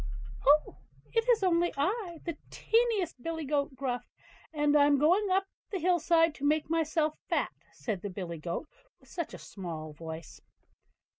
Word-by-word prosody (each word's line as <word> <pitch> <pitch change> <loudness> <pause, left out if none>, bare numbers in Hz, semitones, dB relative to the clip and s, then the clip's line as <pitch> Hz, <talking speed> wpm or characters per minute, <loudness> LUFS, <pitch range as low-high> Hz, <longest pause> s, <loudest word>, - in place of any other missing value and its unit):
"Oh! 300 +2 +5 0.4
it 455 +1 +1
is 455 -4 +4
only 345 -1 +3
I, 350 +2 -1
the 335 - -3
tiniest 445 - +1
billy 320 +2 -3
goat 280 -1 0
Gruff; 255 -2 -3 0.4
and 295 -1 +2
I'm 290 -1 +6
going 360 +8 +3
up 380 +1 +3
to 390 - -39 0.2
the 385 - 0
hill 355 +1 +3
side 330 0 +4
to 275 - -10
make 305 +2 +2
myself 315 -1 +1
fat", - - +1 0.2
said 210 -6 -4
the 205 - -4
billy 180 -3 -5
goat, 170 - -4 0.3
with - - -22
such 340 -3 -4
a - - -7
small 160 -5 -7
voice. 160 +1 -8
305 Hz, 165 wpm, -30 LUFS, 260-350 Hz, 0.4 s, I'm